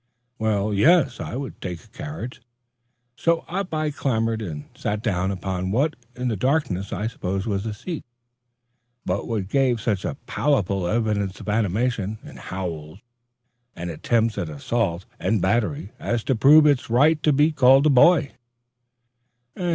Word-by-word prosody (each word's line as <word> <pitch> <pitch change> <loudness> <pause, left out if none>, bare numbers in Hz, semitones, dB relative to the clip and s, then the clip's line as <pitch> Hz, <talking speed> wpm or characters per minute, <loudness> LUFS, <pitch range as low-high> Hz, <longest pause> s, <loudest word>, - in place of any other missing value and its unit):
Well, 105 -1 0
yes, 140 - +4
I - - -5
would 135 +1 -6
take 90 -3 -5
a - - -20
carriage; 135 -1 -7 0.7
so 165 +3 +1
up 190 +2 -3
I 155 -1 -1
clambered 115 -5 -1
and 80 -8 -6
sat 105 +1 -3
down 95 -4 0
upon 95 -1 -3
what 140 +9 +1 0.2
in 125 0 -3
the 115 - 0
darkness 125 - 0
I 100 +2 -2
supposed 95 -3 -3
was 100 -1 -2
a 110 - -3
seat, 165 - -6 1.0
but 90 +2 -2
what 105 -5 -2
gave 130 0 +2
such 110 -5 -1 0.2
palpable 100 -10 0
evidences 105 -2 -1
of - - -7
animation 110 0 0
in - - -11
howls 85 -4 -6 0.8
and 85 0 -5
attempts 110 +6 0
at 85 -5 -3
assault 85 +4 -2
and 100 +4 +1
battery, 110 - 0
as 120 -1 -1
to 135 - +1
prove 150 +7 +7
its 145 -5 +2
right 150 +6 +4
to 150 - +3
be 150 +3 +4
called 135 -1 +5
a 155 - +5
boy. 145 +2 +5
110 Hz, 150 wpm, -23 LUFS, 95-140 Hz, 1.0 s, prove